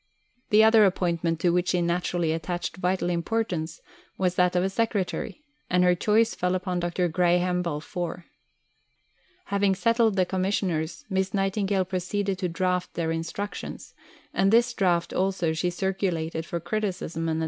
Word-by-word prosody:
The 215 -1 +6
other 220 0 +7
appointment 170 -4 +1
to 175 - +3
which 180 0 +1
she 180 - +2
naturally 175 -1 0
attached 175 +3 -3
vital 185 0 0
importance 170 -3 -2 0.4
was 180 -2 +1
that 180 0 +2
of 180 - +3
a 190 - +1
secretary, 220 +6 -2 0.3
and 180 0 +3
her 180 0 +5
choice 220 +5 +2
fell 180 +1 0
upon 185 -1 -2
Dr. 175 +1 0
Graham 180 +1 +2
Balfour. 170 +2 -4 1.2
Having 200 -1 +1
settled 225 +2 +2
the 185 -2 +3
Commissioners, 180 -3 -1
Miss 190 0 -1
Nightingale 195 -1 +1
proceeded 190 +1 -2
to 180 -3 -1
draft 180 +1 -1
their 165 -1 -1
Instructions, 165 +5 -5 0.4
and 195 - +3
this 240 +2 +4
draft 175 -5 +1
also 185 -4 0
she 175 +3 0
circulated 175 -3 -2
for 170 - -3
criticism 170 -3 -2
and 160 - 0
advice. - - -1
180 Hz, 150 wpm, -26 LUFS, 170-195 Hz, 1.2 s, other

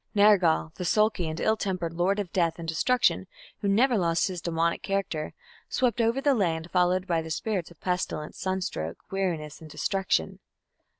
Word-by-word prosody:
Nergal, 190 -6 +4
the 180 - -4
sulky 210 -1 +2
and 155 - -5
ill 220 - +2
tempered 185 -6 -3
lord 180 +4 +1
of 200 -4 -4
death 170 -3 +1
and 165 -1 -7
destruction, 245 +10 +2 0.3
who 205 - -2
never 230 +3 +3
lost 170 +1 +1
his 180 -2 -5
demoniac 170 0 0
character, 195 -6 -2 0.4
swept 245 -3 +1
over 230 +3 +2
the 280 0 +3
land, 170 -7 -1
followed 180 0 +2
by 170 -3 +1
the 160 - -8
spirits 185 +1 -2
of 170 - -18
pestilence, 180 -4 -3
sunstroke, 185 - -3
weariness, 170 -6 -2
and 160 - -10
destruction. 185 - -1
180 Hz, 170 wpm, -27 LUFS, 165-200 Hz, 0.4 s, Nergal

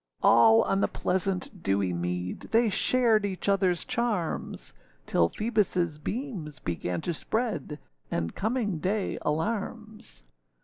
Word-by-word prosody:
All 115 -1 +7
on 195 - +1
the - - +3
pleasant 185 +1 -2
dewy 95 - +1
mead, 90 +1 -3
They 230 0 +4
shared 230 0 +3
each 195 -2 -3
otherâs 190 -3 +2
charms; 230 -9 -2 0.3
Till 85 +5 +2
Phoebusâ 185 -8 0
beams 210 - -4
began 90 0 -3
to 175 - -2
spread, 200 - -2 0.3
And 85 0 -2
coming 215 -5 -1
day 195 +5 -1
alarms. 215 - -3
190 Hz, 120 wpm, -28 LUFS, 150-220 Hz, 0.3 s, All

